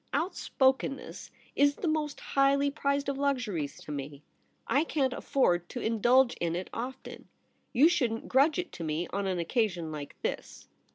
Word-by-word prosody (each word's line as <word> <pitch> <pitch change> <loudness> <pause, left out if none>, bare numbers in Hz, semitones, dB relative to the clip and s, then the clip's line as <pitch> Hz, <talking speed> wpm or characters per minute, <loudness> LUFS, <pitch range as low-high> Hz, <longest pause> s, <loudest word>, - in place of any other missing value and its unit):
' - - -41
Outspokenness 270 -6 -1 0.3
is 285 0 +4
the 355 - -3
most 305 -2 -1
highly 280 +1 +2
priced 280 -1 -1
of 275 -1 -2
luxuries 235 - -1
to - - -9
me. 140 0 -6 0.4
I 280 - +2
can't 275 -5 0
afford 175 -13 +1
to 250 - -5
indulge 240 +3 +3
in 170 -1 -1
it 180 +1 -5
often. 255 +3 -7 0.4
You 280 +5 +6
shouldn't 235 -9 0
grudge 280 +4 +4
it 360 0 -3
to 170 - -7
me 160 +2 -1
on 200 0 -1
an 185 -1 -1
occasion 175 -3 -1
like 150 -2 -7
this. - - -4
255 Hz, 165 wpm, -29 LUFS, 175-280 Hz, 0.4 s, You